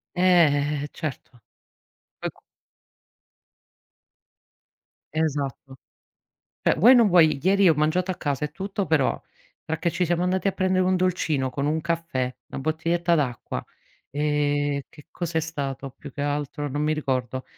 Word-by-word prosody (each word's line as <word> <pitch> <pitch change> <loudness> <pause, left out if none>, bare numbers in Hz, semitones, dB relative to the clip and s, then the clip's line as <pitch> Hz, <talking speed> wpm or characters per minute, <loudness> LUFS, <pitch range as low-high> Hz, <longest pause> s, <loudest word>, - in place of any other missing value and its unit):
Eh, 150 -5 +3
eh, - - -4
certo. 135 -5 -7 0.8
Poi, - - -3
co - - -26 2.7
Esatto. 140 -3 -2 0.9
Cioè, - - +3
vuoi 225 +11 +7
o - - +8
non 235 -3 +6
vuoi, 165 -5 +5
ieri 195 +1 +4
ho 165 - +5
mangiato 155 +5 +1
a - - -1
casa 145 0 -2
e - - -1
tutto, 195 0 -3
però 150 -4 +1 0.4
perché 160 +2 -1
ci 180 - 0
siamo 175 0 0
andati 185 +2 +1
a - - 0
prendere 185 -1 +1
un 185 0 +2
dolcino 165 -7 0
con 140 +2 -2
un 155 +2 0
caffè, 160 -7 -2
una - - -6
bottiglietta 165 +3 +1
d'acqua, 135 -7 -2 0.5
ehm, 145 0 0
che 150 -2 -16
cosa 170 -2 -2
è - - +2
stato 140 -4 -4
più 140 - -10
che 140 - -7
altro? 145 0 -2
Non 145 +2 -2
mi 155 +1 +2
ricordo. 130 -4 -2
155 Hz, 150 wpm, -25 LUFS, 145-175 Hz, 2.7 s, o